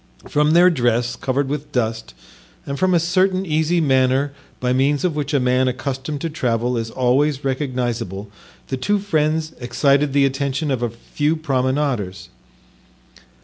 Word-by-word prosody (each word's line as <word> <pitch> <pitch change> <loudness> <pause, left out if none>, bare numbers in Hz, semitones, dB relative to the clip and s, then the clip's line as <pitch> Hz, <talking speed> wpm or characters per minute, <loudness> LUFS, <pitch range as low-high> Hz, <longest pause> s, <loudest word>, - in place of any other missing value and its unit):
From 150 +1 +2
their 180 +2 +6
dress, 120 -4 +1
covered 135 +3 -1
with 145 +1 -4
dust, 110 - -2 0.5
and 140 0 -4
from 185 -1 +3
a - - +5
certain 185 +3 +1
easy 160 +1 +1
manner 135 -1 +2 0.3
by 125 0 0
means 140 +2 +1
of 170 -4 0
which 150 -2 -2
a 145 - +2
man 125 +1 +2
accustomed 135 +3 -3
to 165 - -2
travel 125 -4 0
is 115 -1 -2
always 135 +4 +1
recognizable, 120 - -2 0.4
the 130 - -2
two 205 +11 +1
friends 160 -5 0
excited 140 +3 +2
the 140 -1 +4
attention 140 +2 -1
of 130 -3 -1
a 120 - 0
few 145 +7 -2
promenaders. 130 - -1
135 Hz, 150 wpm, -20 LUFS, 125-150 Hz, 0.5 s, their